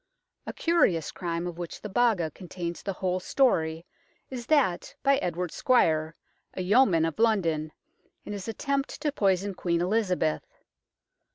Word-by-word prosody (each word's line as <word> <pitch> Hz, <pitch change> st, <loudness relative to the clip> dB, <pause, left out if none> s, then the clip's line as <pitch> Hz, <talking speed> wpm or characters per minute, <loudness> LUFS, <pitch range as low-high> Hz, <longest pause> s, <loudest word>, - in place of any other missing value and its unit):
A -, -, -4 dB
curious 275 Hz, -, +2 dB
crime 170 Hz, -1 st, -3 dB
of 175 Hz, -1 st, -6 dB
which 175 Hz, -2 st, -6 dB
the -, -, -6 dB
Baga 205 Hz, -6 st, +2 dB
contains 175 Hz, 0 st, -6 dB
the 195 Hz, -, -3 dB
whole 185 Hz, 0 st, -1 dB
story 165 Hz, -8 st, +1 dB, 0.5 s
is 245 Hz, -2 st, -6 dB
that 270 Hz, -, +1 dB
by 275 Hz, 0 st, +4 dB
Edward 180 Hz, -3 st, -2 dB
Squyer, 160 Hz, -10 st, +2 dB, 0.4 s
a 185 Hz, -, -3 dB
yeoman 190 Hz, -5 st, +4 dB
of 165 Hz, +5 st, -4 dB
London, 165 Hz, -9 st, +1 dB, 0.5 s
in -, -, -5 dB
his 200 Hz, 0 st, -6 dB
attempt 275 Hz, +4 st, -2 dB
to 300 Hz, -1 st, 0 dB
poison 195 Hz, -5 st, +1 dB
Queen 170 Hz, -2 st, -1 dB
Elizabeth. 180 Hz, -, 0 dB
185 Hz, 145 wpm, -27 LUFS, 170-230 Hz, 0.5 s, by